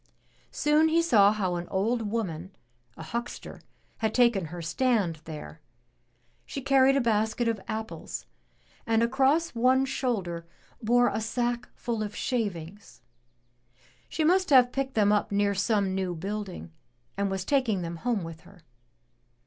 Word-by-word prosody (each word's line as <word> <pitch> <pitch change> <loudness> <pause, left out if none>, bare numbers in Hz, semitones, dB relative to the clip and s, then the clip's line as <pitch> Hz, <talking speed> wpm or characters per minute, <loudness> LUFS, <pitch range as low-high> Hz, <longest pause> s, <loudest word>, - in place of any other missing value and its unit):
Soon 300 +2 +3
he 330 +1 +3
saw 215 -12 +5
how 195 -4 -1
an 175 0 -5
old 220 +3 -1
woman, 185 -6 -3 0.5
a 160 - -7
huckster, 235 +8 -6 0.4
had 220 -1 -1
taken 235 -7 +3
her 175 +3 -7
stand 185 0 0
there. 150 - -9 0.8
She - - -6
carried 270 0 +4
a - - +3
basket 220 +1 +1
of 225 -4 -1
apples, 220 0 -5 0.6
and 225 0 +3
across 270 +7 +2
one 255 +3 +3
shoulder 200 -11 -2 0.3
bore 245 +2 +3
a 220 - -2
sack 240 +2 -2
full 235 -3 -3
of 205 -1 -4
shavings. 200 - -4 1.1
She 315 - -1
must 370 +4 +3
have 255 -3 +6
picked 270 0 -3
them 205 -2 +4
up 210 0 +1
near 200 0 +2
some 200 -1 +1
new 190 -2 -2
building, 195 0 -5 0.4
and 200 0 0
was 190 -1 -3
taking 235 -9 +1
them 170 0 -5
home 230 0 -1
with 165 -1 -8
her. 185 -4 -18
220 Hz, 145 wpm, -27 LUFS, 190-250 Hz, 1.1 s, have